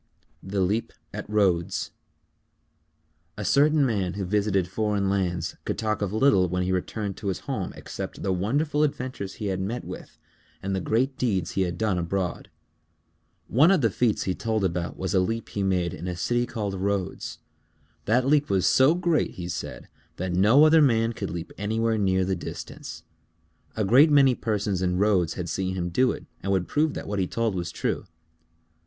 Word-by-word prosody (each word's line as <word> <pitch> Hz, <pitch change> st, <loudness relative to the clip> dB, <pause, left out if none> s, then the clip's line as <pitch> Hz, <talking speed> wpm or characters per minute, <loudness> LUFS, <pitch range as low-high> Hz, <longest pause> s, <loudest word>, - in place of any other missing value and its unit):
_ -, -, -45 dB, 0.5 s
THE 100 Hz, 0 st, 0 dB
LEAP 105 Hz, +5 st, 0 dB, 0.2 s
AT -, -, -6 dB
RHODES 95 Hz, -5 st, +1 dB, 1.5 s
A 105 Hz, -, -4 dB
certain 145 Hz, +3 st, +4 dB
man 100 Hz, -7 st, 0 dB
who 100 Hz, -1 st, -3 dB
visited 100 Hz, -1 st, +1 dB
foreign 100 Hz, 0 st, 0 dB
lands 90 Hz, -4 st, -1 dB
could -, -, -3 dB
talk 110 Hz, -1 st, -1 dB
of 100 Hz, -2 st, -1 dB
little 110 Hz, -5 st, +3 dB
when 90 Hz, +1 st, 0 dB
he 90 Hz, -, -1 dB
returned 95 Hz, +2 st, -2 dB
to 105 Hz, -, -6 dB
his 95 Hz, -, -2 dB
home -, -, -3 dB
except -, -, -7 dB
the 95 Hz, -, +1 dB
wonderful 145 Hz, -, 0 dB
adventures 130 Hz, -9 st, -2 dB
he 105 Hz, -, -6 dB
had 95 Hz, -2 st, -1 dB
met 115 Hz, +6 st, -3 dB
with -, -, -9 dB, 0.5 s
and 95 Hz, 0 st, -1 dB
the 95 Hz, -, -1 dB
great 130 Hz, +8 st, 0 dB
deeds 100 Hz, -8 st, 0 dB
he 95 Hz, -, -1 dB
had 90 Hz, -2 st, -1 dB
done 100 Hz, -4 st, 0 dB
abroad. 90 Hz, +1 st, -3 dB, 1.0 s
One 145 Hz, +8 st, +5 dB
of 190 Hz, -5 st, +4 dB
the 115 Hz, -4 st, +2 dB
feats 115 Hz, +2 st, +1 dB
he 95 Hz, -, -1 dB
told 110 Hz, +1 st, -1 dB
about 85 Hz, -1 st, -2 dB
was 95 Hz, +2 st, -2 dB
a 95 Hz, -, +4 dB
leap 115 Hz, +5 st, -2 dB
he -, -, -5 dB
had 95 Hz, -1 st, +1 dB
made 90 Hz, -3 st, 0 dB
in 90 Hz, -, -6 dB
a 90 Hz, -, -3 dB
city 120 Hz, +6 st, 0 dB
Called 105 Hz, -4 st, -3 dB
Rhodes. 95 Hz, 0 st, -2 dB, 0.7 s
That 125 Hz, +4 st, +2 dB
leap 145 Hz, +1 st, +3 dB
was 95 Hz, -2 st, +2 dB
so 135 Hz, +5 st, +5 dB
great, 175 Hz, -3 st, 0 dB
he 90 Hz, -1 st, -5 dB
said, 90 Hz, -, -6 dB, 0.3 s
that 90 Hz, 0 st, -3 dB
no 105 Hz, +11 st, +6 dB
other 155 Hz, +1 st, +6 dB
man 115 Hz, -4 st, +3 dB
could 100 Hz, -3 st, -4 dB
leap 85 Hz, -1 st, -6 dB
anywhere 110 Hz, +2 st, 0 dB
near 95 Hz, -2 st, +2 dB
the 95 Hz, 0 st, 0 dB
distance. 85 Hz, -, -8 dB, 0.7 s
A 110 Hz, -, +1 dB
great 135 Hz, +10 st, +6 dB
many 140 Hz, -3 st, +6 dB
persons 105 Hz, -5 st, -1 dB
in 90 Hz, -1 st, 0 dB
Rhodes 95 Hz, -4 st, +2 dB
had 90 Hz, -2 st, -4 dB
seen 95 Hz, +2 st, -2 dB
him 90 Hz, -1 st, -2 dB
do 125 Hz, +9 st, +3 dB
it -, -, -7 dB, 0.2 s
and 100 Hz, -, -2 dB
would 95 Hz, -2 st, +1 dB
prove 155 Hz, +1 st, +1 dB
that -, -, -5 dB
what 100 Hz, -1 st, -2 dB
he 95 Hz, -, +1 dB
told 115 Hz, 0 st, -1 dB
was 85 Hz, -2 st, -3 dB
true. -, -, -2 dB
100 Hz, 195 wpm, -26 LUFS, 95-115 Hz, 1.5 s, no